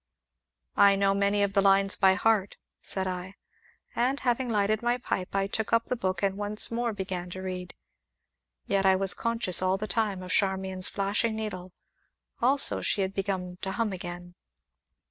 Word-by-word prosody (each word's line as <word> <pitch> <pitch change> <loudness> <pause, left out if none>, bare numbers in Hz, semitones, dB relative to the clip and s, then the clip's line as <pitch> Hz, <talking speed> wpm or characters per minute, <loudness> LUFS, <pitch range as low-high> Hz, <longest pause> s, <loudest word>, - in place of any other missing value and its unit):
"I 200 0 +6
know 195 0 +2
many 200 +1 +2
of 200 -1 -1
the 200 - +4
lines 195 0 +4
by 190 -1 +4
heart," 205 -1 +1 0.2
said 190 -1 -3
I. 185 +1 -5 0.6
And 260 +4 0
having 245 0 0
lighted 215 0 +1
my 240 +1 +1
pipe, 195 -6 -4
I 195 0 +1
took 215 +2 -3
up 230 0 +2
the 250 - -2
book, 185 -5 -3
and 195 0 0
once 210 +2 +3
more 235 0 -1
began 185 -3 -5
to 185 +1 -7
read. 180 -1 -6 0.9
Yet 195 -1 +1
I 190 -1 +5
was 190 -1 +2
conscious, 230 -6 +1
all 185 +1 +1
the 210 - -4
time, 210 -4 -2
of 180 - -7
Charmian's 190 -1 0
flashing 210 +3 -1
needle, 185 -4 -6 0.7
also 270 +4 +3
she 200 - 0
had 190 0 -2
begun 185 -2 -3
to 190 - -3
hum 225 -3 -1
again. 175 -1 -8
195 Hz, 175 wpm, -27 LUFS, 185-215 Hz, 0.9 s, I